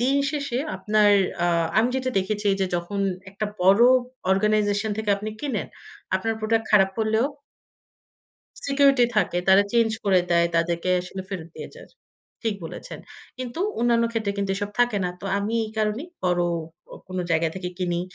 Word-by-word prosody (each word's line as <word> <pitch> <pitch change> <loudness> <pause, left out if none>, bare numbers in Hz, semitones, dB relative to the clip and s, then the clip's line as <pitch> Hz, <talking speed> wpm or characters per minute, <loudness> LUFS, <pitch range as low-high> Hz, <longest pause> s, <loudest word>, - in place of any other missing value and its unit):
দিন 265 +3 +2
শেষে, 280 -5 -2 0.2
আপনার 210 -1 +3 0.3
আ - - +3 0.3
আমি 230 - +3
যেটা 260 0 -1
দেখেছি 205 +2 -2
যে, 190 - +2
যখন 175 +4 -4 0.3
একটা 205 +2 -3 0.2
বড় 195 +5 +6 0.5
অর্গানাইজেশন 210 +1 +2
থেকে 220 -1 -1
আপনি 210 +2 -5
কেনেন, 260 -9 -2 0.5
আপনার 225 +4 -2
প্রোডাক্ট 225 0 0
খারাপ 195 -2 +5
করলেও 220 +2 +2 1.4
সিকিউরিটি 275 -2 +4
থাকে। 195 -4 +2
তারা 190 +1 +7
চেঞ্জ 230 -1 +3
করে 190 -3 +4
দেয়। 170 0 +4
তাদেরকে 170 +1 0
আসলে 180 +2 -7
ফেরত 175 -5 -6
দিয়ে - - -7
যায়। - - -13 0.5
ঠিক 225 -2 0
বলেছেন। 165 - -8 0.4
কিন্তু 255 +4 -5 0.2
অন্যান্য 235 -1 +3
ক্ষেত্রে 215 -3 -1
কিন্তু 200 -1 -1
এসব 205 +1 -3
থাকে 245 -3 +3
না। 180 - -1
তো, - - -10
আমি 205 +2 -2
এই 215 - -7
কারণেই 215 +9 -1 0.2
বড় 175 -1 +2 0.5
অ - - -10
কোন 185 0 -4
জায়গা 165 0 +2
থেকে 185 -1 -4
কিনি। 175 -2 -1
210 Hz, 160 wpm, -24 LUFS, 190-230 Hz, 1.4 s, তারা